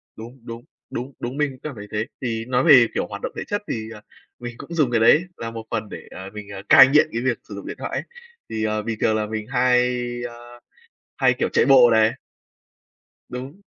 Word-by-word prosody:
Đúng, 120 +4 -11
đúng, 115 0 -8 0.3
đúng, 130 +3 -6
đúng, 125 +4 -5
mình 150 -1 +1
cũng 130 - -14
cảm 155 -3 -6
thấy 105 -1 -9
thế. 105 +1 -1 0.2
Thì 115 -2 -3
nói 125 +1 +1
về, 130 -8 +7
kiểu, - - -2
hoạt - - -8
động - - -4
thể - - -3
chất, 205 0 -2
thì, 110 -1 -4
à, 105 - -12 0.4
mình 120 -1 -7
cũng 140 +6 -9
dùng 150 -7 +1
cái 115 - +2
đấy 150 +9 +5
là 115 0 -5
một 115 -1 -7
phần 110 -2 -3
để, - - -9
à, 95 +1 -8
mình, 105 -1 -9
à, 95 -1 -7
cai 135 - +10
nghiện 150 +3 +4
cái 115 - -1
việc 125 -3 0
sử 100 - -7
dụng 100 - -8
điện - - -6
thoại - - -4
ấy. - - -2 0.5
Thì, 110 -1 -3
ờ, 110 0 0
bình 110 0 -4
thường 110 - +2
là 110 -1 0
mình 110 0 -5
hay, 125 -1 +2 0.3
ơ, 120 +1 -14 0.6
hay, - - +4
kiểu, - - -1
chạy - - +2
bộ 130 -3 +7
này. 110 0 +4 1.2
Đúng. 135 +10 -8
120 Hz, 235 wpm, -22 LUFS, 110-130 Hz, 1.2 s, cai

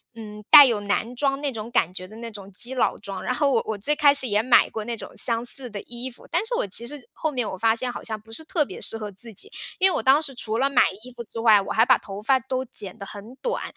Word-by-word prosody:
嗯， 210 -1 -10
带 290 - +11
有 225 -5 0
男 220 +4 -2
装 275 +1 0
那 290 -1 -1
种 225 +1 -7
感 180 -7 +1
觉 185 0 -7
的 215 +4 -13
那 230 0 -7
种 200 -1 -11
基 240 +7 0
佬 255 - +1
装， 195 -2 -7
然 250 - -1
后 285 +1 +2
我 240 -4 +2
我 220 -1 -3
最 295 +9 +1
开 290 -2 +5
始 265 -3 0
也 210 +1 +1
买 250 - +5
过 220 - -4
那 235 0 -5
种 - - -7
相 235 -1 +4
似 250 0 -3
的 205 -2 -7
衣 240 +2 -6
服， - - -15
但 375 +6 0
是 485 - -3
我 - - -1
其 225 +5 -3
实 290 +2 -6
后 315 -1 -2
面 245 -5 -2
我 190 - -6
发 225 +3 +3
现 250 +2 -3
好 - - -7
像 220 -2 -5
不 225 +1 -22
是 320 - -1
特 310 -2 0
别 190 - -10
适 225 - -1
合 210 -2 -6
自 225 +3 -9
己。 410 - -2 0.3
因 380 +1 +5
为 - - -1
我 - - -1
当 275 +3 +5
时 275 -4 -5
除 220 -2 -3
了 275 +2 +2
买 275 - +4 0.2
衣 250 -1 -12
服 235 - -8
之 225 +1 -9
外， 215 -3 +5
我 - - -6
还 225 +2 +4
把 - - +5
头 200 0 -9
发 265 +4 +3
都 260 +1 -3
剪 205 -4 -8
得 200 - -8
很 210 +5 -10
短， - - -3
235 Hz, 325 characters per minute, -24 LUFS, 210-265 Hz, 0.3 s, 带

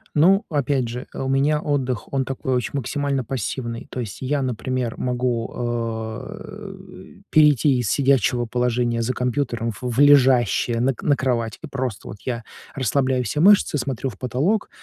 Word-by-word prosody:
Ну, 190 +7 +5
опять 140 -4 0
же, 125 +1 -6
у 135 - -3
меня 145 +3 +2
отдых, 130 -7 -2
он 135 -1 0
такой 135 0 -2
очень 125 - -1
максимально 140 0 -1
пассивный. 120 -1 -4
То 125 - -4
есть 105 -5 -6
я, 140 +1 -1
например, 125 -1 -2
могу, 125 -2 -1
э, 120 - -6 0.2
перейти 150 -3 +5
из 115 -5 -1
сидячего 130 -3 +2
положения 120 0 0
за 130 +3 -1
компьютером 125 -2 -1
в 100 - -10
в 125 0 -3
лежащее 130 -4 +4
на 135 +2 +2
к - - -13
на 145 -2 +3
кровать 120 -4 -1
и - - -6
просто 130 -6 -4
вот 100 - -8
я 120 -3 -3 0.3
расслабляю 130 -1 +1
все 150 +7 -2
мышцы, 200 -4 +5
смотрю 130 0 -2
в 100 - -14
потолок 140 - 0
130 Hz, 160 wpm, -22 LUFS, 120-140 Hz, 0.3 s, Ну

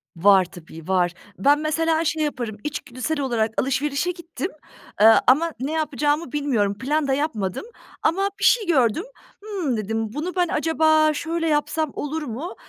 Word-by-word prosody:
Var 190 +2 +5
tabii, 165 -2 -12
var. 180 -2 +1 0.2
Ben 290 +2 +4
mesela 320 +1 0
şey 310 +1 0
yaparım, 240 -7 -3
içgüdüsel 290 +1 -4
olarak 230 -5 0
alışverişe 280 +5 0
gittim, 345 +1 -6 0.5
eee, 220 +1 +9
ama 310 +5 +4
ne 270 +4 -3
yapacağımı 300 -1 -1
bilmiyorum, 235 -9 0
plan 290 +4 0
da 270 - +1
yapmadım. 250 - -2 0.4
Ama 390 +5 +2
bir - - -5
şey 460 -4 +4
gördüm, 265 - +2 0.4
ımm, 365 - -2
dedim, 220 +1 -3
"Bunu 335 +7 -4
ben 355 -1 +2
acaba 315 0 +3
şöyle 330 +2 -2
yapsam 305 0 0
olur 305 +2 -4
mu?" 280 +9 -6
290 Hz, 150 wpm, -23 LUFS, 230-320 Hz, 0.5 s, eee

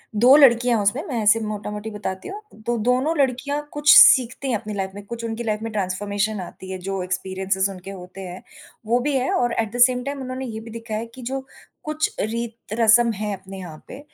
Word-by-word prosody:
2 245 +6 +7
लड़कियाँ 245 -3 +5
हैं 205 - 0
उसमें, 245 +9 +1
मैं 240 -7 -2
ऐसे 210 +2 +5
मोटामोटी 210 0 -5
बताती 190 -3 -5
हूँ, 405 +2 -7 0.2
तो 240 0 0
दोनों 255 +8 +1
लड़कियाँ 280 +2 0
कुछ 295 +1 +5
सीखती 255 +2 +7
हैं - - +1
अपनी 210 0 -7
लाइफ़ 190 -1 -3
में, 205 - -8
कुछ 230 +2 -7
उनकी 230 +1 -4
लाइफ़ 215 -1 -2
में 225 - -4
ट्रांसफॉर्मेशन 205 +2 -2
आती 185 +1 -10
है, 185 - -4
जो 190 +1 -4
एक्सपीरियेंसेज़ 190 +1 -1
उनके 190 +1 -9
होते 185 0 -10
हैं। 180 +1 -8 0.4
वो 240 +3 +2
भी 280 +2 -1
है 255 0 0
और 240 -1 +1
एट 220 -2 -1
द - - -3
सेम 250 -1 -1
टाइम 280 0 -4
उन्होंने 260 +1 -5
ये 220 -2 -6
भी 225 0 -10
दिखाया 225 -1 -5
है 230 - -5
कि, 250 +3 -13
जो 265 +2 -4 0.4
कुछ 305 0 -2
रीत 230 0 -4
रस्म 230 +1 +5
है 210 +1 -3
अपने 195 0 -9
यहाँ 160 -4 -10
पे 265 - -9
225 Hz, 220 wpm, -22 LUFS, 200-250 Hz, 0.4 s, 2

